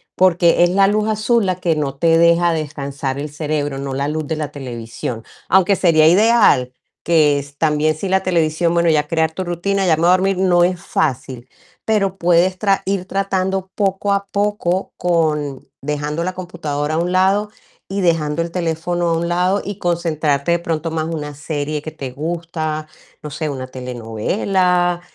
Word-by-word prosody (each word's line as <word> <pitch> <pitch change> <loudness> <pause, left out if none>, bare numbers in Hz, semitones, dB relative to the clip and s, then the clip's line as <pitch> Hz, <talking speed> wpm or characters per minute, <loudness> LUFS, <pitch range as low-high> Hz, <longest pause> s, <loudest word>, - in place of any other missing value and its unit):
Porque 175 -2 +4
es - - +1
la 195 +1 +4
luz 210 +1 +1
azul 215 0 +1
la 185 - +1
que 170 -3 0
no 140 -2 -2
te 165 +3 +3
deja 170 +1 +4
descansar 140 -3 -4
el 150 +1 -4
cerebro, 150 -2 -2
no 135 -1 -4
la 140 +2 -1
luz 155 -1 -3
de 160 - -2
la 150 -2 -4
televisión. 120 -3 -6 0.3
Aunque 190 +2 +4
sería 165 -4 +4
ideal 195 - +4 0.3
que 150 -4 +3
es 140 0 -11
también 155 0 +1
si 185 +4 -4
la 190 0 +2
televisión, 170 -1 +1
bueno, 170 -1 +2
ya 150 -1 +2
crear 160 0 +1
tu 185 +3 -4
rutina, 190 +3 -1
ya 160 - +4
me 160 - -3
voy - - +4
a - - +7
dormir 190 +1 +2
no 180 -2 +3
es 180 0 +1
fácil, 130 -1 -2 0.4
pero 195 -3 +1
puedes 180 +1 +2
tra 200 -2 +1
ir 190 -1 -1
tratando 190 -1 -2
poco 200 0 0
a 200 0 -1
poco 200 -3 -1
con 150 -5 -1
dejando 150 +3 -3
la 185 +1 -2
computadora 155 -5 -4
a - - 0
un 175 +1 -1
lado 195 +3 +2 0.4
y 195 0 -2
dejando 165 -2 +1
el 170 - -6
teléfono 175 0 -1
a 165 - +1
un 170 +1 -2
lado 180 +3 +1
y 205 0 -6
concentrarte 160 -3 0
de 170 - +2
pronto 165 -1 -3
más 160 0 -2
una 150 -3 -5
serie 150 0 -3
que 155 - -6
te 130 -2 -7
gusta, 155 +1 -4 0.4
no 150 - -6
sé, 155 +1 -3
una 130 -2 -5
telenovela, 175 - -1
170 Hz, 185 wpm, -19 LUFS, 150-185 Hz, 0.4 s, a